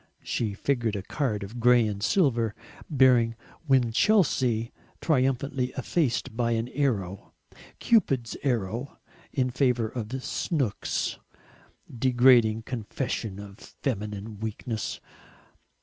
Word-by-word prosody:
She 105 -4 -2
figured 115 -2 0
a 100 - -4
card 110 -4 -2
of 110 +5 -8
grey 120 0 +5
and 100 -2 -3
silver 115 - +2 0.3
bearing 125 -5 +4 0.3
"Winchelsea," 125 - +2 0.3
triumphantly 135 -2 0
effaced 130 -4 -1
by 120 0 +1
an 115 +1 -1
arrow, 105 -10 -2 0.4
Cupid's 135 - +2
arrow, 120 0 -2 0.3
in 125 -2 0
favour 125 -3 +1
of 125 +3 -5
"Snooks." 135 - -2 0.8
Degrading 120 -3 +4
confession 115 -3 -4
of 100 +1 -10
feminine 105 -4 -5
weakness! 110 0 -4
120 Hz, 100 wpm, -27 LUFS, 110-130 Hz, 0.8 s, grey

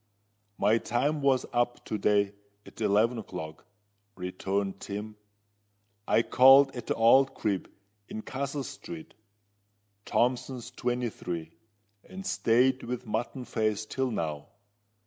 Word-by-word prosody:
"My 110 +2 +3
time 145 +7 0
was 135 -2 +3
up 120 0 0
to - - -3
day 100 0 +2 0.3
at - - -13
eleven 110 +3 +3
o'clock," 80 -7 -8 0.5
returned 95 +2 -3
Tim. 105 +2 -6 0.9
"I 115 - +4
called 135 +2 +7
at 120 -2 -7
the - - 0
old 135 +4 +5
crib 100 -4 -2 0.4
in 110 - -6
Castle 140 +1 -3
Street—Thompson's, 105 -1 -5
twenty 125 -1 -2
three, 85 -4 -5 0.5
and 190 +1 -9
stayed 125 0 +3
with 125 +1 -5
Mutton 120 +4 -3
Face 110 -2 -1
till 130 +4 -1
now. 80 -9 -3
115 Hz, 115 wpm, -29 LUFS, 100-125 Hz, 0.9 s, called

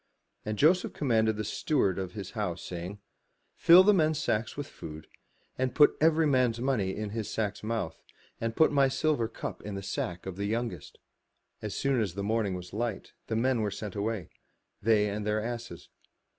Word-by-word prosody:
And 105 0 -3
Joseph 175 - +3
commanded 110 -6 +1
the 110 - -2
steward 105 - 0
of 95 -1 -4
his 100 -3 -6
house, 100 -6 -3
saying, 90 +3 -6 0.6
"Fill 175 +2 +8
the 210 +2 +6
men's 155 -4 +2
sacks 110 -5 -1
with 145 - -3
food, 80 - -9 0.5
and 130 0 0
put 150 - +6
every 160 0 +4
man's 125 -5 +2
money 120 -7 0
in 105 -1 -4
his 110 -1 -3
sack's 105 -2 -2
mouth, 105 -7 -3 0.4
and 115 0 -2
put 160 - +5
my 140 -2 +4
silver 135 -3 +1
cup - - -6
in 105 -1 -6
the 100 - -5
sack 90 -2 -4
of 95 -1 -6
the 100 - -2
youngest." 110 -8 -3 0.6
As 105 -2 -4
soon 135 -3 +1
as 95 -5 -2
the 100 - -3
morning 105 -2 0
was 90 0 -8
light, 110 -1 -3
the 110 - -1
men 120 +1 +2
were 105 - 0
sent 100 0 -6
away, 105 -3 -3 0.5
they 105 -1 +3
and 105 +1 -3
their 105 +1 0
asses. 120 -5 -6
110 Hz, 185 wpm, -29 LUFS, 100-130 Hz, 0.6 s, Fill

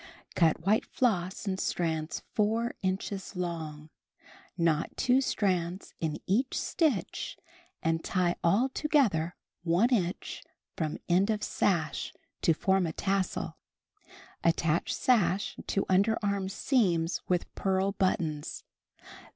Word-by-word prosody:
Cut 165 -1 +2
white 215 +3 +3
floss 190 -6 0
in 190 -1 -1
strands 160 -3 -1
4 225 +3 +1
inches 190 +1 -3
long; 160 -4 -4 0.7
knot 165 -2 +2
2 255 +1 +3
strands 185 -6 -1
in 160 -2 -1
each 245 +8 +1
stitch 300 - -1 0.5
and 165 0 +1
tie 180 -2 +1
all 200 +10 +4
together 245 - +1 0.3
one 175 +7 +3
inch 185 -6 -1 0.3
from 155 -2 -2
end 185 +4 +3
of 215 -1 0
sash, 165 -7 0 0.3
to - - +4
form 190 +1 +2
a 160 - -4
tassel. 195 +1 -1 0.9
Attach 165 -1 +2
sash 205 -6 +2
to 195 - 0
underarm 200 0 +1
seams 180 - +1
with 180 -1 0
pearl 190 0 +1
buttons. 170 -7 -1
185 Hz, 110 wpm, -30 LUFS, 170-205 Hz, 0.9 s, all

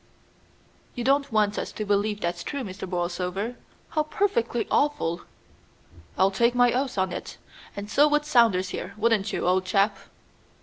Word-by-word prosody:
"You 245 - -3
don't 275 +2 +2
want 210 -1 +2
us - - -4
to 215 - -4
believe 205 +1 0
that 170 - +1
it's 175 0 -7
true, 280 -2 -4
Mr. 190 -3 -7
Borlsover? 180 +5 -2 0.4
How 315 -2 +1
perfectly 305 - 0
awful!" 285 - +1 1.0
"I'll 190 +1 +4
take 235 +5 +2
my 245 -1 +4
oath 260 -2 -1
on 190 -1 0
it, - - -7 0.4
and 200 0 -6
so 285 +7 +4
would 295 0 +1
Saunders 230 -10 +3
here; 190 +2 -6
wouldn't 215 -2 +1
you, - - -2
old 185 +1 +2
chap?" 195 +2 +2
210 Hz, 165 wpm, -26 LUFS, 190-250 Hz, 1.0 s, I'll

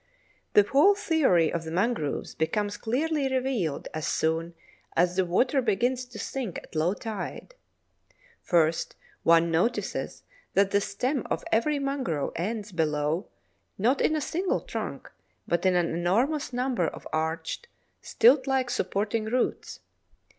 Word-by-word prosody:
The 205 - +7
whole 290 - +5
theory 275 - +2
of 170 -1 -2
the 160 - -6
mangroves 180 - -1
becomes 205 +5 -1
clearly 275 +3 -1
revealed 250 - -1
as 155 0 -3
soon 165 +1 0 0.4
as 175 +1 +2
the 190 0 +2
water 250 +10 +2
begins 245 +3 0
to 245 -3 -12
sink 240 -9 -4
at - - -11
low 165 +5 +1
tide. 225 - -6 0.9
First 165 -2 +1 0.3
one 165 0 +4
notices 180 +10 -1 0.3
that 195 0 +4
the 200 - +3
stem 250 +7 -2
of - - -2
every 290 +7 +2
mangrove 275 - -2
ends 210 +4 -3
below, 155 +1 0 0.5
not 245 +8 +2
in 315 - +2
a 305 - -1
single 355 +6 -1
trunk, - - -6 0.4
but 170 +2 +1
in 185 - +3
an 175 -2 +1
enormous 235 - +1
number 245 -8 0
of - - -7
arched, 160 - -2 0.3
stilt 260 +4 +4
like 265 -2 +1
supporting 210 +4 -1
roots. 245 +3 -2
210 Hz, 140 wpm, -27 LUFS, 170-260 Hz, 0.9 s, The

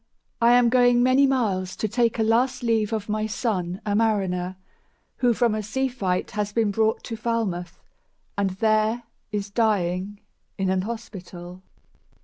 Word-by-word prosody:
I 235 +1 +6
am 245 -1 +5
going 245 0 +4
many 260 +2 +5
miles 200 -9 0
to 215 - -2
take 235 +2 +1
A 225 - +2
last 240 +4 +1
leave 225 -2 +1
of 215 -2 -2
my 215 0 -1
son, 190 -6 -2
a 205 -1 0
mariner, 190 -5 0 0.6
Who 245 -2 +3
from 235 -2 +2
a 215 - -1
sea 265 +6 -1
fight 190 -8 -2
has 210 0 -2
been 220 -1 +1
brought 220 +2 +1
to 230 - -5
Falmouth, 210 -7 -3 0.6
And 200 -1 +1
there 215 +4 +1 0.3
is 205 -1 -3
dying 200 -3 0 0.4
in 190 -1 0
an 190 0 +1
hospital." 185 -5 -8
215 Hz, 155 wpm, -24 LUFS, 190-235 Hz, 0.6 s, I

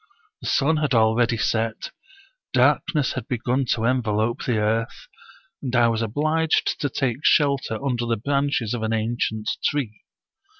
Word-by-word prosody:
The - - -6
sun 155 +3 +2
had 150 -4 0
already 115 +1 +3
set, 110 +2 -1 0.6
darkness 150 -4 +2
had - - -5
begun 125 0 -1
to 115 - -2
envelope 115 -1 0
the 120 -5 0
earth, 110 +2 -1 0.5
and 130 -2 -3
I 120 -1 +4
was 115 -1 -1
obliged 155 +8 0
to 145 - -1
take 130 -3 -1
shelter 140 -6 +2
under 120 -3 -1
the 115 -1 0
branches 140 -2 -1
of 120 - -3
an 110 0 -1
ancient 110 -1 -2 0.2
tree. 125 -8 -1
120 Hz, 145 wpm, -23 LUFS, 110-140 Hz, 0.6 s, I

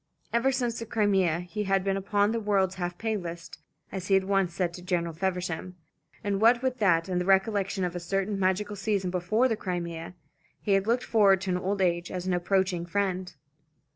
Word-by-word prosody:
Ever 235 +3 +3
since 245 -3 -1
the 230 - -6
Crimea 195 -7 +2
he 210 +4 -4
had 195 -1 +2
been 195 0 0
upon 205 +2 +1
the 230 - -1
world's 200 -3 +1
half 175 0 -3
pay 220 -1 -1
list, 170 -3 -7 0.3
as 185 -1 -5
he 195 - +4
had 190 - +3
once 195 -2 +1
said 175 0 -1
to 180 - -9
General 175 -2 -1
Feversham, 180 0 -3 0.5
and 200 -1 -1
what 235 +2 +5
with 260 -1 -1
that 170 -5 +3
and 180 -1 0
the - - -2
recollection 195 0 +2
of 180 -1 -2
a - - -2
certain 195 +3 -2
magical 195 +2 0
season 195 -2 -1
before 185 +8 +2
the 225 - 0
Crimea, 175 -3 -5 0.4
he 205 - -2
had 195 +1 +3
looked 240 +2 +2
forward 200 -4 +4
to 180 -1 -1
old 195 +1 0
age 175 -1 0
as 180 -1 -4
an 185 - 0
approaching 180 0 +1
friend. 185 0 -2
190 Hz, 200 wpm, -28 LUFS, 180-205 Hz, 0.5 s, what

